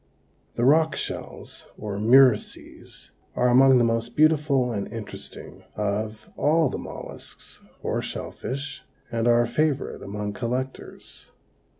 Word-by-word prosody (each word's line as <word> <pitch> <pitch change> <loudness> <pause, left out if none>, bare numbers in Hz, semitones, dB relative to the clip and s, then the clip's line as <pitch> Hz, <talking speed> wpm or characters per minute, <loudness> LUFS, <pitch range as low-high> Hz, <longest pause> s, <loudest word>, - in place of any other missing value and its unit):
The 120 - +1
rock 155 +2 +4
shells - - -6
or 105 -2 -5
murices 125 +1 +2 0.2
are 125 - +3
among 130 +1 +6
the 120 - +4
most 115 +1 -1
beautiful 150 -5 +3
and 100 -3 -4
interesting 115 -3 -9
of 105 +1 -3
all 160 0 +3
the - - -4
mollusks - - -9 0.2
or - - -1
shell - - -5
fish, 140 +2 -6 0.3
and 115 0 0
are 120 0 +5
a - - -2
favorite 145 +2 -1
among 105 +1 -4
collectors. 125 +4 -5
120 Hz, 125 wpm, -25 LUFS, 110-140 Hz, 0.3 s, among